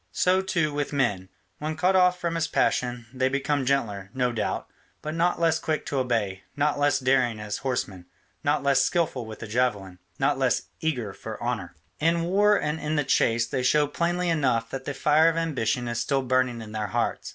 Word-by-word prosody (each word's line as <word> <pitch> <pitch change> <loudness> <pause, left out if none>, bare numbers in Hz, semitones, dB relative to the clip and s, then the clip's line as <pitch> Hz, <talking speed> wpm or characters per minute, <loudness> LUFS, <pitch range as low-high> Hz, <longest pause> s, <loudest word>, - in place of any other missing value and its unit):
So, 185 +1 +2
too, 170 -5 0
with 145 -1 -2
men; 105 -10 0 0.3
when 155 +1 -3
cut 185 +3 +2
off 180 -1 +4
from 170 -1 -2
this 165 -1 0
passion, 125 -5 0
they 130 0 +1
become 140 0 -1
gentler, 105 -8 0
no 125 -1 +1
doubt, 115 - -2 0.4
but 155 - -3
not 170 +2 +1
less 165 -1 +2
quick 155 -1 -2
to 140 - -1
obey, 110 -7 -1
not 145 0 +1
less 145 0 +3
daring 125 -4 +2
as 105 -1 -4
horsemen, 100 -9 -3 0.4
not 145 -1 +1
less 135 -1 +4
skilful 140 -8 0
with 110 -1 -9
the 110 - -6
javelin, 105 -6 -1 0.2
not - - +1
less - - +1 0.2
eager 125 -11 -2
for - - -8
honour. - - -3 0.2
In 165 +2 +2
war 205 +4 +3
and 150 +2 -2
in 155 0 -2
the 150 - +2
chase 115 -3 +2
they 120 +2 -2
show 150 +4 +3
plainly 175 +4 -1
enough 125 -8 +1
that 135 0 -5
the 145 - -4
fire 155 +2 +4
of 165 - -2
ambition 125 -7 -1
is 120 0 -2
still 135 +3 0
burning 130 -2 0
in 105 - -10
their 105 -1 -3
hearts. - - -2
135 Hz, 200 wpm, -26 LUFS, 120-160 Hz, 0.4 s, off